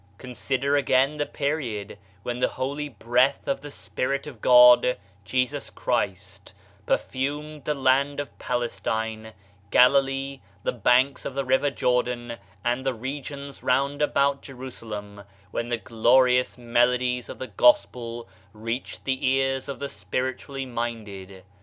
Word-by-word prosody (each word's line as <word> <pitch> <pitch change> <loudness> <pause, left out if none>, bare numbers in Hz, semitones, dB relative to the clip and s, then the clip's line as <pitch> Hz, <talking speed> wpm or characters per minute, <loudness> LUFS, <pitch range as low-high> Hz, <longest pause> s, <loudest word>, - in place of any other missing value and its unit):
Consider 130 +4 -1
again 140 +1 +2
the 145 - -1
period 125 -10 -3 0.2
when 120 0 -3
the - - +3
holy 145 +3 -3
breath 120 +2 +1
of 275 -1 -1
the 145 - -8
Spirit 140 0 -3
of 130 -8 -10
God 125 0 +7 0.3
(Jesus 130 +6 -1
Christ) 100 -4 -3 0.3
per - - +4
fumed 145 +2 -4
the 150 - 0
land 135 +1 +2
of 145 - -6
Palestine, 110 -2 -3 0.4
Galilee, 135 +2 +3 0.2
the - - +1
banks 125 +4 +2
of 135 - -5
the 140 -1 -1
river 130 +3 +3
of 140 - -2
Jordan, 125 -1 0 0.3
and 120 +2 0
the 135 -2 -1
regions 140 +3 -6
round 140 +3 +1
about 140 -1 +2
Jerusalem 110 -6 -8 0.3
when 120 - -2
the 120 0 -1
glorious 125 +3 +3
melodies 125 +1 +1
of - - -7
the 130 - -6
Gos 305 0 +5
pel 120 -1 -8 0.3
reached 115 +4 -5
the 130 -1 -1
ears 135 +1 +1
of 140 - -4
the 140 - -4
spiritually 130 +1 -4
minded. 105 -6 -5
130 Hz, 140 wpm, -25 LUFS, 120-140 Hz, 0.4 s, God